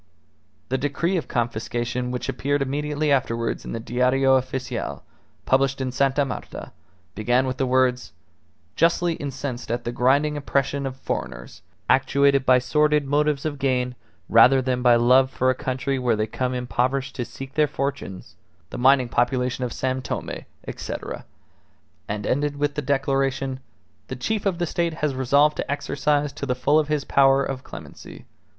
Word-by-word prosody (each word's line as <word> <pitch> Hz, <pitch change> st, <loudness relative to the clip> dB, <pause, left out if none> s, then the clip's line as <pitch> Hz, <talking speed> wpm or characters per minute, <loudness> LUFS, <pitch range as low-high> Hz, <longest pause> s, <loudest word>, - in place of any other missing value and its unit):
The 130 Hz, +1 st, 0 dB
decree 145 Hz, +7 st, -1 dB
of 165 Hz, -, -3 dB
confiscation 120 Hz, +1 st, -2 dB
which 125 Hz, 0 st, -4 dB
appeared 145 Hz, +1 st, 0 dB
immediately 150 Hz, +2 st, -1 dB
afterwards 115 Hz, -4 st, 0 dB
in -, -, -7 dB
the 115 Hz, -, -3 dB
Diario 125 Hz, +3 st, +2 dB
Official, 125 Hz, -, -2 dB, 0.4 s
published 135 Hz, +1 st, +2 dB
in 130 Hz, -1 st, -2 dB
Sta. 140 Hz, +2 st, +1 dB
Marta, 135 Hz, -, -7 dB, 0.4 s
began 120 Hz, +5 st, +1 dB
with 130 Hz, 0 st, -3 dB
the 135 Hz, -, 0 dB
words: 125 Hz, -1 st, +1 dB, 0.6 s
"Justly 170 Hz, +1 st, +2 dB
incensed 135 Hz, -5 st, -5 dB
at 120 Hz, +1 st, -2 dB
the 120 Hz, -, -3 dB
grinding 140 Hz, +5 st, +2 dB
oppression 140 Hz, -1 st, -1 dB
of 130 Hz, -, -6 dB
foreigners, 60 Hz, -, -5 dB, 0.3 s
actuated 140 Hz, -1 st, +3 dB
by 130 Hz, 0 st, +7 dB
sordid 150 Hz, +3 st, +2 dB
motives 145 Hz, 0 st, +1 dB
of 145 Hz, -2 st, -3 dB
gain 125 Hz, -2 st, 0 dB, 0.3 s
rather 125 Hz, +4 st, +6 dB
than 125 Hz, -1 st, -1 dB
by 120 Hz, -1 st, +6 dB
love 125 Hz, +3 st, +5 dB
for 130 Hz, 0 st, +1 dB
a -, -, +1 dB
country 130 Hz, +1 st, -2 dB
where 120 Hz, -3 st, +1 dB
they 110 Hz, 0 st, 0 dB
come 125 Hz, +3 st, -3 dB
impoverished 130 Hz, +2 st, -1 dB
to 125 Hz, -, -1 dB
seek 135 Hz, +3 st, -9 dB
their 150 Hz, 0 st, +3 dB
fortunes, 135 Hz, -9 st, -5 dB, 0.4 s
the -, -, -5 dB
mining 130 Hz, 0 st, +5 dB
population 125 Hz, +1 st, 0 dB
of 125 Hz, -, -2 dB
San 130 Hz, +2 st, -2 dB
Tome, -, -, -4 dB, 0.4 s
etc... -, -, -6 dB, 0.4 s
." -, -, -40 dB
and 105 Hz, 0 st, -3 dB
ended 145 Hz, +2 st, 0 dB
with 145 Hz, 0 st, 0 dB
the 150 Hz, -, -2 dB
declaration: 135 Hz, -1 st, 0 dB, 0.5 s
"The 130 Hz, -, -5 dB
chief 205 Hz, -, -2 dB
of 185 Hz, -3 st, 0 dB
the 175 Hz, -, 0 dB
State 170 Hz, 0 st, -1 dB
has 145 Hz, -, 0 dB
resolved 140 Hz, +4 st, +3 dB
to -, -, -3 dB
exercise 145 Hz, 0 st, 0 dB
to 140 Hz, -, -5 dB
the 125 Hz, -, 0 dB
full 145 Hz, +5 st, +3 dB
his 150 Hz, -1 st, -1 dB
power 135 Hz, 0 st, +4 dB
of 130 Hz, -1 st, -5 dB
clemency. -, -, -11 dB
130 Hz, 165 wpm, -23 LUFS, 125-145 Hz, 0.6 s, by